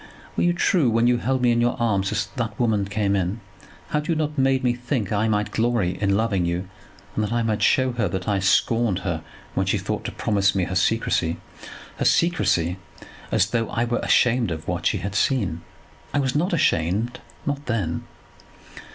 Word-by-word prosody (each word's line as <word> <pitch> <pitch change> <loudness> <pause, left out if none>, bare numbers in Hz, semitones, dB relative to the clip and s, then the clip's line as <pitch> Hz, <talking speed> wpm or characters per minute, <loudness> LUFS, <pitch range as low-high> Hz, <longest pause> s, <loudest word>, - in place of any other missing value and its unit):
"Were - - 0
you 175 - +3
true 170 -5 +2
when 115 +1 +2
you 120 0 +4
held 130 +1 -1
me 120 - +4
in 120 0 +2
your 120 0 +1
arms 100 -5 +1
as - - 0
that 115 -3 -3
woman 110 -5 +2
came 100 0 0
in? 95 +3 -1 0.5
Had 150 0 -1
you 165 - +1
not 150 -1 -1
made 135 -1 +2
me 125 -1 +2
think 120 -3 -2
that 105 - 0
I 110 - +2
might 105 -1 0
glory 115 -6 +1
in 100 -1 +2
loving 105 -5 +1
you, 85 +2 -2 0.5
and 110 - -1
that 105 - -2
I 120 0 +1
might 110 -2 -1
show 130 -1 +3
her 120 -1 0
that 95 +1 -4
I 100 -2 +1
scorned 100 +2 +2
her 80 -4 -1 0.3
when - - 0
she - - +2
thought - - -3
to - - -3
promise 100 -2 +1
me 95 - +1
her 90 - -3
secrecy; 95 -3 +1 0.6
her - - -1
secrecy, 90 - +2 0.5
as 100 - +2
though 115 -2 0
I 115 - 0
were 120 0 -1
ashamed 120 -3 +3
of 80 -2 -5
what 90 -1 -1
she 105 - +1
had 100 +2 -4
seen. 100 - 0 0.5
I - - +3
was 130 -2 0
not 170 +6 +1
ashamed, 110 - +1 0.3
not 145 0 -3
then. 95 -9 -2
110 Hz, 205 wpm, -23 LUFS, 95-125 Hz, 0.6 s, you